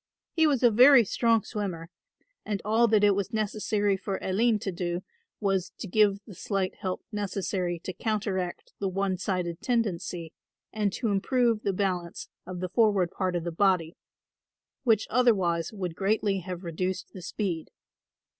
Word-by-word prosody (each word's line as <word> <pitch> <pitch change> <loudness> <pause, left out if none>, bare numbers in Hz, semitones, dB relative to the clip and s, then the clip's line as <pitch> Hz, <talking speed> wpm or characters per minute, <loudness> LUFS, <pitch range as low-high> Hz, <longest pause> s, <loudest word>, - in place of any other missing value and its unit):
He 320 -2 +4
was 275 -4 +1
a 240 - +7
very 245 +2 +7
strong 230 +1 +2
swimmer 180 -6 -5 0.5
and 205 -2 -2
all 225 +2 +4
that 215 -2 +3
it 205 -1 +6
was 200 +2 -2
necessary 210 -2 0
for 190 0 -3
Aline 220 +4 +2
to 195 - -2
do 175 0 -3 0.4
was 195 -3 0
to - - -6
give 205 0 +3
the 205 - -11
slight 190 +1 -2
help 185 -1 -4
necessary 195 -3 -2
to 185 - -4
counteract 195 -3 -3
the 195 - -1
one 190 -1 -1
sided 180 -3 -2
tendency 180 -8 -2 0.4
and 210 -2 0
to 230 - -1
improve 230 +2 +1
the 200 - 0
balance 180 -3 -2 0.2
of 180 -1 -6
the 185 - -2
forward 200 -4 +3
part 185 -2 -1
of 175 - -1
the 170 - -3
body, 175 -2 +1 0.9
which 220 -4 +3
otherwise 190 -9 +2
would 185 -5 -4
greatly 200 +1 0
have 180 0 -6
reduced 180 +2 -3
the 185 - -9
speed. 175 -3 -3
195 Hz, 160 wpm, -28 LUFS, 180-215 Hz, 0.9 s, a